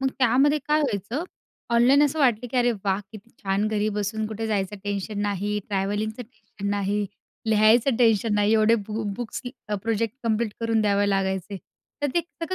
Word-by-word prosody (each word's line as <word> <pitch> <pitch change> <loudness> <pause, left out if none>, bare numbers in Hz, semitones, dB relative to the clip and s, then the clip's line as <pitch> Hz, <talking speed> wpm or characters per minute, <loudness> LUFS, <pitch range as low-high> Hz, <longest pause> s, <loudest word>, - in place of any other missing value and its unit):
मग 270 - +1
त्यामध्ये 270 +4 +4
काय 300 +1 +3
व्हायचं, 245 - -2 0.5
ऑनलाईन 255 +5 +5
असं 295 +2 -1
वाटलं 245 -4 +2
की 255 - -3
अरे 245 0 +4
वाह! 195 0 +1
किती 215 +2 -12
छान 195 +2 0
घरी 215 0 0
बसून 215 +1 -1
कुठे 220 +1 -4
जायचं 205 -1 -1
टेन्शन 205 +1 -3
नाही, 205 +1 -1
ट्रॅव्हलिंगचं 205 +3 -2
टेन्शन 215 -3 -8
नाही, 205 0 0 0.4
लिहायचं 220 +3 +4
टेन्शन 225 -3 +3
नाही 205 +1 +3
एवढे 220 +1 +5
बु 220 +1 -3
बुक्स 240 -2 -5
की 245 - -6 0.3
प्रोजेक्ट 225 0 -1
कंप्लीट 225 -1 0
करून 230 -1 +1
द्यावे 205 -1 +2
लागायचे. 190 0 -1 0.5
तर 290 - +3
ते 345 - +4
सगळं 335 +1 -6
220 Hz, 170 wpm, -25 LUFS, 205-240 Hz, 0.5 s, ऑनलाईन